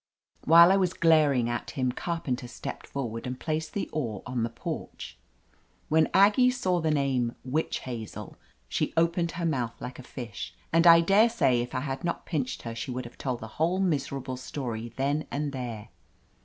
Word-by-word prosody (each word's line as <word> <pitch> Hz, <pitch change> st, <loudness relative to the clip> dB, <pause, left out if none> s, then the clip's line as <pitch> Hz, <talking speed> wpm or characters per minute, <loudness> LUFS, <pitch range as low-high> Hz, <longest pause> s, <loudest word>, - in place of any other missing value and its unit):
While 170 Hz, +3 st, +8 dB
I 195 Hz, -, +5 dB
was 185 Hz, -2 st, +1 dB
glaring 150 Hz, -7 st, +4 dB
14t 120 Hz, 0 st, -3 dB
hini 130 Hz, -2 st, 0 dB
Carpenter 135 Hz, -8 st, -3 dB
stepped -, -, -7 dB
forward 120 Hz, -4 st, -4 dB
and 125 Hz, 0 st, -5 dB
placed 155 Hz, -1 st, -3 dB
the 200 Hz, -, -1 dB
oar 115 Hz, -10 st, -3 dB
blade -, -, -7 dB
on 120 Hz, -, 0 dB
the 115 Hz, -, 0 dB
porch. 115 Hz, -, -7 dB, 0.7 s
When 160 Hz, 0 st, +4 dB
Aggie 210 Hz, +6 st, +5 dB
saw 185 Hz, -9 st, 0 dB
the 160 Hz, -, +1 dB
name 135 Hz, -5 st, +1 dB
"Witch 150 Hz, +5 st, -1 dB
Hazel" 115 Hz, -4 st, -7 dB, 0.3 s
she -, -, -2 dB
opened 170 Hz, +1 st, +2 dB
her 170 Hz, 0 st, -3 dB
mouth 125 Hz, -8 st, -1 dB
like 125 Hz, +1 st, -7 dB
a -, -, -6 dB
fish, 120 Hz, -2 st, -7 dB, 0.2 s
and 165 Hz, +1 st, +5 dB
I 165 Hz, 0 st, +9 dB
daresay 195 Hz, -, +4 dB
if 120 Hz, 0 st, -5 dB
I 130 Hz, -, 0 dB
had 135 Hz, -1 st, -4 dB
not 170 Hz, -, -2 dB
pinched 140 Hz, -7 st, -3 dB
her 115 Hz, -, -5 dB
she 115 Hz, +3 st, -5 dB
would 125 Hz, 0 st, -4 dB
have 120 Hz, -, -12 dB
told 125 Hz, -3 st, -3 dB
the 110 Hz, -, -6 dB
whole 175 Hz, +4 st, +2 dB
miserable 140 Hz, -7 st, -1 dB
story 120 Hz, -3 st, -5 dB
then 145 Hz, +3 st, 0 dB
and 145 Hz, 0 st, -3 dB
tliere. 120 Hz, -5 st, -5 dB
140 Hz, 185 wpm, -28 LUFS, 125-165 Hz, 0.7 s, I